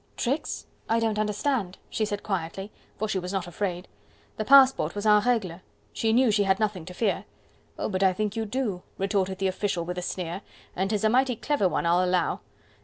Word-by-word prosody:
"Tricks? 270 +5 -2 0.2
I 225 +1 +3
don't 220 -2 0
understand!" 210 -1 -1
she 220 - -1
said 205 -1 -4
quietly, 195 +1 -3 0.3
for 215 - -1
she 200 -2 -1
was 180 0 -5
not 195 -2 -1
afraid. 180 +1 -3 0.5
The 215 - -1
passport 265 - +6
was 205 +1 -3
en 210 -1 +6
regle: 205 -7 0 0.3
she 225 - +1
knew 245 0 +4
she 205 0 +3
had 195 -1 +2
nothing 205 -6 -1
to 180 - -8
fear. 215 -1 0 0.5
"Oh! - - -1
but 190 -2 -2
I 190 -1 +5
think 210 +2 -2
you 225 -1 -2
do!" 210 -6 -2 0.2
retorted 195 -1 0
the 195 - -2
official 185 -2 -1
with 180 +1 -3
a - - -4
sneer, 180 +1 -4 0.3
"and 190 +2 0
'tis 210 -1 0
a 215 - +4
mighty 255 +1 +3
clever 220 -6 +1
one, - - -1
I'll 175 +2 +4
allow. 180 0 +1
200 Hz, 205 wpm, -27 LUFS, 185-220 Hz, 0.5 s, passport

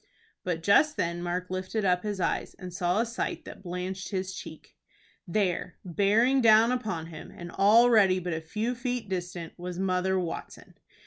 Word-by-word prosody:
But 165 -3 -2
just 290 - +4
then 170 +1 -1
Mark 180 +1 -3
lifted 185 +3 -2
up 180 -1 +3
his 205 -1 -3
eyes, - - -1
and 180 -2 -9
saw 180 +2 +1
a - - 0
sight 235 +1 -4
that - - -10
blanched 185 +1 -5
his 190 -2 -3
cheek. - - -10 0.5
There, 180 -1 -1
bearing 210 +9 +3
down 225 +1 +6
upon 205 -10 -2
him, 165 -2 -10
and 175 0 -9
already 210 -1 +5
but 180 -1 -3
a 160 - -3
few 215 +9 -2
feet 245 -3 -3
distant, 175 -2 -4
was 180 0 -5
Mother 190 0 +1
Watson! 175 -3 -5
185 Hz, 170 wpm, -28 LUFS, 180-215 Hz, 0.5 s, down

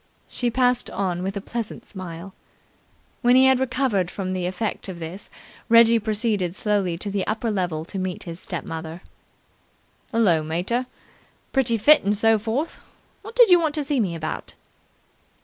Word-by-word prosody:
She 245 - -1
passed 250 0 +2
on 180 -3 -2
with 195 +2 -3
a - - -4
pleasant 230 +1 -5
smile. 185 -1 -8 0.9
When 245 0 +5
he 260 +1 +7
had 265 -1 +5
recovered 255 -8 0
from 185 -1 -4
the 180 -1 -2
effect 195 +2 -3
of 185 - -6
this 170 +4 -6 0.4
Reggie 230 0 +7
proceeded 210 -4 -1
slowly 200 -5 0
to 200 +3 -4
the 195 -1 -2
upper 220 +1 -1
level 175 -6 -2
to 195 +2 -5
meet 185 -1 -4
his 170 0 -8
step - - -5
mother. 165 +2 -6 1.1
"Hullo, 205 -9 +3
mater. 180 +11 -2 0.6
Pretty 245 -4 +2
fit 295 +8 +6
and 205 +1 +1
so 225 0 +4
forth? 235 +9 -3 0.4
What 435 +3 -10
did 480 -5 +6
you 350 - +8
want 315 -2 0
to 300 - 0
see 285 -1 0
me 185 -7 0
about?" 160 -1 -5
210 Hz, 165 wpm, -23 LUFS, 180-245 Hz, 1.1 s, you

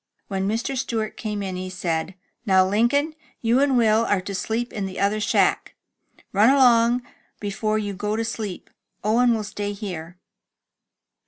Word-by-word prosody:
When 195 -1 -1
Mr. 230 +6 -1
Stewart 225 -4 -2
came 210 -2 -4
in, 190 -1 -4
he 185 0 -5
said: 180 -1 -2 0.3
"Now, 190 -4 +4
Lincoln, 240 +10 +2 0.3
you 235 +3 +3
and 275 -2 +3
Will 225 -1 +4
are 205 -4 +1
to 195 +2 -6
sleep 225 +5 -2
in 200 -2 -3
the 185 - -7
other 200 +2 +1
shack. 210 - +1 0.6
Run 210 +4 +5
right 275 - +5
along, 245 -2 +4 0.4
before 215 +1 -1
you 205 -2 -2
go 210 +2 -2
to 225 +1 -1
sleep. 215 -5 -5 0.3
Owen 235 +3 +3
will 220 - -2
stay 205 0 -4
here.' 180 -5 -7
215 Hz, 165 wpm, -23 LUFS, 195-230 Hz, 0.6 s, Run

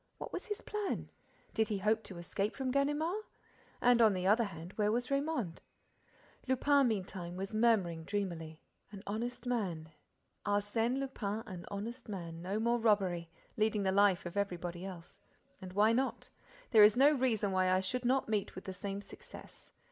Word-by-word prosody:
What - - -7
was - - -5
his 415 -1 -4
plan? 420 -2 -3 0.4
Did 220 -1 +2
he 210 - -1
hope 215 +3 +2
to 190 - -7
escape 195 +4 -2
from 265 -2 -2
Ganimard? 295 +8 +1 0.6
And, 245 -1 +6
on 220 -3 +6
the 185 0 -2
other 220 +4 +4
hand, 170 -1 -8
where 210 -1 +2
was 245 +2 -1
Raymonde? 275 - -1 0.9
Lupin, 275 +1 +4
meantime, 185 -5 -3
was 195 +2 -4
murmuring, 210 -8 +2
dreamily: 170 -6 -3 0.3
"An 200 -1 -9
honest 235 +5 -4
man.—Arsène 205 - -2
Lupin 225 -6 -3
an 185 -5 -8
honest 225 +4 -6
man—no 180 +1 -4
more 235 +2 +2
robbery—leading 200 0 0
the 190 - +2
life 200 -1 +4
of 175 - -6
everybody 175 -2 -2
else.—And 185 +4 -12
why 210 +3 +4
not? 260 +3 -1 0.4
There 220 -3 +8
is 210 +2 +7
no 280 +3 +7
reason 240 -8 +1
why 185 -1 +2
I 185 0 +4
should 190 +7 -2
not 260 +2 +2
meet 210 -2 -1
with 185 - -7
the 190 - -5
same 195 +2 -5
success. - - -12
205 Hz, 160 wpm, -34 LUFS, 185-240 Hz, 0.9 s, There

